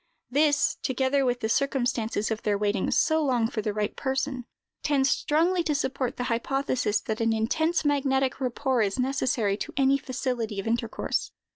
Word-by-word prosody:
This, 290 Hz, +1 st, +3 dB
together 265 Hz, +2 st, +1 dB
with 245 Hz, 0 st, 0 dB
the 220 Hz, -, 0 dB
circumstance 235 Hz, -3 st, 0 dB
of 220 Hz, -, -2 dB
their 205 Hz, -1 st, +1 dB
waiting 205 Hz, -1 st, 0 dB
so 315 Hz, 0 st, +2 dB
long 245 Hz, -5 st, +2 dB
for 225 Hz, -1 st, -3 dB
the 210 Hz, -, -1 dB
right 210 Hz, 0 st, -2 dB
person, 265 Hz, -2 st, -2 dB, 0.4 s
tends 275 Hz, -2 st, +2 dB
strongly 340 Hz, +4 st, +2 dB
to 300 Hz, -, +1 dB
support 265 Hz, -3 st, -2 dB
the 245 Hz, -, -2 dB
hypothesis 245 Hz, -2 st, 0 dB
that 220 Hz, +1 st, -3 dB
an 225 Hz, 0 st, +2 dB
intense 315 Hz, +10 st, 0 dB
magnetic 270 Hz, -2 st, +1 dB
rapport 255 Hz, 0 st, 0 dB
is 200 Hz, -2 st, 0 dB
necessary 250 Hz, -6 st, 0 dB
to -, -, -6 dB
any 275 Hz, 0 st, +3 dB
facility 245 Hz, -5 st, -3 dB
of 195 Hz, -, -4 dB
intercourse. 230 Hz, 0 st, -1 dB
255 Hz, 165 wpm, -27 LUFS, 225-275 Hz, 0.4 s, This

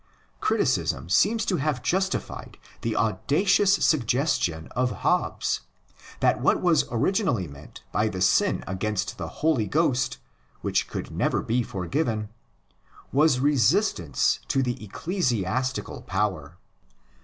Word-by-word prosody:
Criticism 85 Hz, -, 0 dB
seems 210 Hz, -, +3 dB
to 185 Hz, -, 0 dB
have 140 Hz, -3 st, -1 dB
justified 190 Hz, +7 st, -2 dB, 0.2 s
the 115 Hz, -1 st, -2 dB
audacious 185 Hz, -, +2 dB
suggestion 125 Hz, -, +1 dB
of 125 Hz, +1 st, 0 dB
Hobbes, -, -, 0 dB, 0.6 s
that -, -, +2 dB
what -, -, +3 dB
was 170 Hz, -5 st, +3 dB
originally 120 Hz, -, +1 dB
meant 70 Hz, +1 st, -13 dB
by 110 Hz, -, +1 dB
the 100 Hz, -4 st, -4 dB
sin 90 Hz, -, +2 dB
against 95 Hz, +2 st, -3 dB
the -, -, -4 dB
Holy 145 Hz, -9 st, 0 dB
Ghost, 130 Hz, -, +1 dB, 0.4 s
which -, -, 0 dB
could -, -, -6 dB
never -, -, 0 dB
be 120 Hz, +3 st, +1 dB
forgiven, 105 Hz, -, -2 dB, 0.8 s
was 140 Hz, -1 st, +3 dB
resistance 140 Hz, -6 st, +2 dB
to 135 Hz, -, +1 dB
the 120 Hz, -3 st, -3 dB
ecclesiastical 130 Hz, -, -2 dB
power. 90 Hz, -5 st, -2 dB
125 Hz, 115 wpm, -25 LUFS, 105-155 Hz, 0.8 s, seems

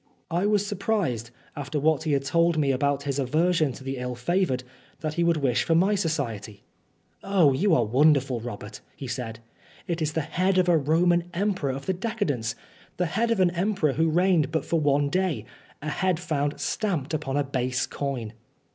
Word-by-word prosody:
I 175 Hz, +4 st, +1 dB
was 205 Hz, -1 st, +2 dB
surprised, 195 Hz, -, -1 dB, 0.3 s
after 145 Hz, +1 st, -3 dB
what 155 Hz, +1 st, +2 dB
he 155 Hz, -, +1 dB
had 140 Hz, -1 st, 0 dB
told 170 Hz, +3 st, +2 dB
me 145 Hz, -3 st, +2 dB
about 140 Hz, +1 st, 0 dB
his 140 Hz, -1 st, -2 dB
aversion 155 Hz, +3 st, +2 dB
to 130 Hz, -, -11 dB
the 135 Hz, 0 st, -4 dB
ill 125 Hz, 0 st, -4 dB
favoured, 130 Hz, 0 st, 0 dB, 0.4 s
that 155 Hz, -1 st, -2 dB
he 170 Hz, -, -1 dB
should 170 Hz, -1 st, +3 dB
wish 135 Hz, -5 st, +1 dB
for 165 Hz, -, +2 dB
my 190 Hz, +5 st, +4 dB
society. 120 Hz, -, -3 dB, 0.6 s
"Oh, 185 Hz, -8 st, +4 dB
you 180 Hz, +5 st, +3 dB
are 120 Hz, -, +3 dB
wonderful, 135 Hz, +1 st, +3 dB
Robert," 105 Hz, -3 st, -8 dB
he 135 Hz, -, -8 dB
said. 120 Hz, -2 st, -5 dB, 0.5 s
"It 170 Hz, -2 st, -2 dB
is 155 Hz, 0 st, 0 dB
the 160 Hz, -, 0 dB
head 185 Hz, +5 st, 0 dB
of 185 Hz, -1 st, +3 dB
a 175 Hz, -, +5 dB
Roman 170 Hz, +3 st, +3 dB
emperor 190 Hz, -6 st, 0 dB
of 135 Hz, +1 st, -6 dB
the 190 Hz, -, 0 dB
decadence 180 Hz, -, -2 dB, 0.4 s
the 180 Hz, -, +1 dB
head 220 Hz, +8 st, 0 dB
of 230 Hz, -3 st, +1 dB
an 180 Hz, -2 st, +4 dB
emperor 180 Hz, -4 st, 0 dB
who 160 Hz, +3 st, +2 dB
reigned 175 Hz, -2 st, +3 dB
but 160 Hz, -, -1 dB
for 165 Hz, -, +1 dB
one 145 Hz, -1 st, +2 dB
day 180 Hz, -, 0 dB, 0.4 s
a 155 Hz, -, -2 dB
head 180 Hz, +1 st, 0 dB
found 145 Hz, -4 st, -2 dB
stamped 170 Hz, -10 st, -2 dB
upon 145 Hz, -3 st, -1 dB
a 145 Hz, -, +2 dB
base 130 Hz, -2 st, -1 dB
coin." 130 Hz, -6 st, -4 dB
155 Hz, 190 wpm, -26 LUFS, 135-180 Hz, 0.6 s, a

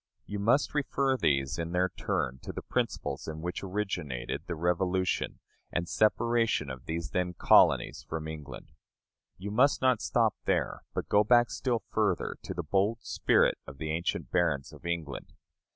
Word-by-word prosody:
You 105 Hz, 0 st, -4 dB
must 120 Hz, +8 st, +2 dB
refer 135 Hz, -2 st, +1 dB
these 70 Hz, -, +1 dB
in 85 Hz, +1 st, -3 dB
their 90 Hz, +1 st, +2 dB
turn 65 Hz, -5 st, -2 dB
to -, -, -6 dB
the -, -, -7 dB
principles -, -, -2 dB
in 80 Hz, 0 st, -5 dB
which 90 Hz, +2 st, -4 dB
originated 90 Hz, -10 st, -3 dB
the 85 Hz, -, -3 dB
Revolution 90 Hz, +2 st, 0 dB, 0.3 s
and 85 Hz, 0 st, -1 dB
separation 110 Hz, -, +2 dB
of 65 Hz, -2 st, -9 dB
these 80 Hz, 0 st, -3 dB
then 90 Hz, -1 st, -1 dB
colonies -, -, +4 dB
from 80 Hz, -1 st, -4 dB
England. 75 Hz, -5 st, -8 dB, 0.7 s
You 100 Hz, +3 st, -5 dB
must 130 Hz, +7 st, +4 dB
not 130 Hz, -3 st, +3 dB
stop -, -, +2 dB
there, -, -, 0 dB
but -, -, -2 dB
go 105 Hz, +1 st, +4 dB
back 120 Hz, +2 st, +4 dB
still 120 Hz, -4 st, -1 dB
further, 105 Hz, -5 st, 0 dB
to -, -, -6 dB
the 85 Hz, -, -3 dB
bold 100 Hz, +8 st, +1 dB
spirit -, -, +2 dB
of 65 Hz, 0 st, -9 dB
the 75 Hz, +2 st, -3 dB
ancient 85 Hz, +2 st, -2 dB
barons 80 Hz, -7 st, +1 dB
of -, -, -9 dB
England. 85 Hz, -4 st, -4 dB
90 Hz, 165 wpm, -30 LUFS, 80-105 Hz, 0.7 s, colonies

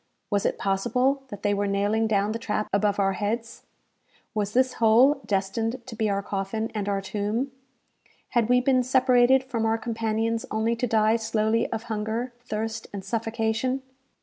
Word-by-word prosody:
Was 200 Hz, -1 st, +2 dB
it -, -, -2 dB
possible 245 Hz, +8 st, +1 dB
that 205 Hz, -6 st, -9 dB
they 205 Hz, -1 st, +2 dB
were 205 Hz, 0 st, 0 dB
nailing 205 Hz, +3 st, +1 dB
down 205 Hz, -1 st, +1 dB
the 225 Hz, -, -3 dB
trap 215 Hz, -1 st, -2 dB
above 205 Hz, 0 st, +2 dB
our 195 Hz, -1 st, +2 dB
heads? 225 Hz, +4 st, -3 dB, 0.7 s
Was 210 Hz, -1 st, -2 dB
this 255 Hz, 0 st, +3 dB
hole 250 Hz, +6 st, +5 dB
destined 225 Hz, +5 st, -1 dB
to 245 Hz, -, -8 dB
be 220 Hz, -1 st, 0 dB
our 200 Hz, 0 st, -1 dB
coffin 200 Hz, +3 st, -3 dB
and 205 Hz, -2 st, -2 dB
our 200 Hz, -1 st, 0 dB
tomb? 215 Hz, +7 st, -2 dB, 0.8 s
Had 235 Hz, -2 st, +1 dB
we 250 Hz, 0 st, +5 dB
been 255 Hz, 0 st, +3 dB
separated 255 Hz, 0 st, +4 dB
from 245 Hz, -4 st, -3 dB
our 225 Hz, 0 st, +2 dB
companions 225 Hz, 0 st, -1 dB
only 220 Hz, +2 st, 0 dB
to 245 Hz, -, 0 dB
die 220 Hz, 0 st, +3 dB
slowly 220 Hz, 0 st, 0 dB
of 225 Hz, -1 st, -3 dB
hunger, 225 Hz, +2 st, -3 dB
thirst, 225 Hz, -1 st, -4 dB
and 195 Hz, -2 st, -7 dB
suffocation? 225 Hz, +4 st, -1 dB
225 Hz, 170 wpm, -26 LUFS, 210-240 Hz, 0.8 s, hole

